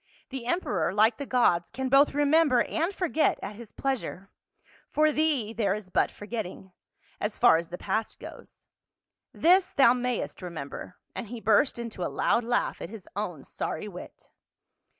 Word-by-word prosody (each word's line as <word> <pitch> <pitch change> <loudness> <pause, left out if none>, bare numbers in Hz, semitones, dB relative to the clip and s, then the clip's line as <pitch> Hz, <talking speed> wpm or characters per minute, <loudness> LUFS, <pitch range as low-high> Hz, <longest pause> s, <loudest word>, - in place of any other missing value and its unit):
" - - -34
The 255 -3 -6
emperor, 200 - 0
like 220 +2 +4
the 280 - -6
gods, 175 -9 +2
can 265 0 -3
both 275 +2 +4
remember 290 -3 +4
and 335 +4 -1
forget 350 -5 +1
at 205 - -5
his 225 -1 -11
pleasure; 250 -8 -3 0.6
for 310 0 +3
thee 290 -8 0
there 205 -4 +1
is 205 -3 -9
but - - +2
forgetting 205 -3 -6 0.2
— - - -34
as 210 +1 -2
far 160 - +6
as 170 0 -5
the 180 - -6
past 220 +3 -2
goes; - - -12 0.7
this 370 +3 +4
thou 265 -4 +6
mayest 250 -4 -3
remember," 170 0 -7 0.2
and 235 - -6
he 240 +2 -7
burst 225 +5 +3
into 230 -5 -6
a - - -1
loud 235 - +1
laugh 245 +1 -1
at - - -5
his 215 -3 -10
own 180 -9 -4
sorry - - -4
wit. - - -11
235 Hz, 170 wpm, -27 LUFS, 200-275 Hz, 0.7 s, far